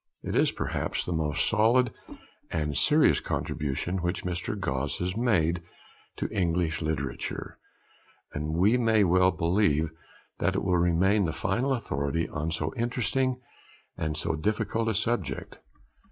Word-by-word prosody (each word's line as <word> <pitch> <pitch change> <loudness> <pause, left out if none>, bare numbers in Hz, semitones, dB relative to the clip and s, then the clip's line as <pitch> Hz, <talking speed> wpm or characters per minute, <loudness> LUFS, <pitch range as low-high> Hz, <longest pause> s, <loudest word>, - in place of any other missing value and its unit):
It - - -3
is - - +4
perhaps - - -2
the 90 - -3
most 75 -3 +1
solid 115 +2 +3 0.6
and 75 -3 -2
serious - - +4
contribution 75 +6 -2
which 85 +1 -2
Mr. 90 +5 -3
Gosse 65 -8 -1
has 90 +1 -2
made 90 -8 +2 0.5
to - - -2
English 85 -3 0
literature, 80 -1 -3 0.7
and 75 +2 -3
we 105 +8 +4
may 110 -3 +4
well 90 0 +4
believe 85 -3 +1 0.5
that - - +1
it - - 0
will 90 -2 +2
remain 90 +4 +3
the 80 - 0
final 115 - 0
authority 80 - -1
on 75 +1 -3
so 80 -1 -2
interesting 125 +2 0 0.5
and 80 -1 -2
so 80 - -1
difficult 110 +6 -1
a 110 - +1
subject. 100 - -2
90 Hz, 140 wpm, -28 LUFS, 80-110 Hz, 0.7 s, is